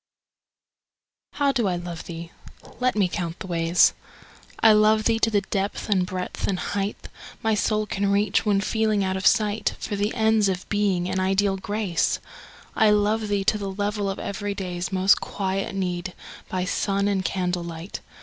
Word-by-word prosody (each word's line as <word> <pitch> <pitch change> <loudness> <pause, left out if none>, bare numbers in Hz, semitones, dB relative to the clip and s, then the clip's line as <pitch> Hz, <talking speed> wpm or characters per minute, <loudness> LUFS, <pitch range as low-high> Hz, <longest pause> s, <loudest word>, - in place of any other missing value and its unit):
T_T - - -10
OW 280 - +5
do 240 -6 +1
I 180 - 0
love 175 -1 -6
thee? 170 0 -7 0.5
Let 255 -2 +1
me 200 -3 +3
count 175 -2 -4
the - - -7
ways. 170 -1 +3 0.7
I 225 - +7
love 215 +1 +4
thee 225 0 +2
to 225 - +3
the 205 -2 +2
depth 200 +2 -3
and 185 -3 +2
breadth 185 0 -4
and 190 - 0
height 200 +2 -3 0.4
My 220 0 +2
soul 215 +1 +1
can 200 0 -1
reach, 200 0 +2
when 205 -2 +2
feeling 215 -1 +1
out 190 0 -1
of 190 0 +1
sight, 210 0 +2
For 210 - -4
the 205 +2 0
ends 220 -3 +3
of 185 0 -3
Being 200 -4 +1
and 190 - -1
Ideal 195 +1 +2
Grace. 200 -3 0 0.6
I 220 -2 +5
love 210 +1 +2
thee 205 -1 0
to 210 +2 +2
the 200 -1 -3
level 205 +1 -2
of 195 - -3
every 200 0 -4
day's 180 -1 -4
Most 190 +1 +4
quiet 195 0 -3
need, 180 -1 -2 0.4
by 185 -1 -1
sun 200 +1 0
and 195 -2 0
candlelight. 180 -1 -3
200 Hz, 180 wpm, -24 LUFS, 185-210 Hz, 0.7 s, I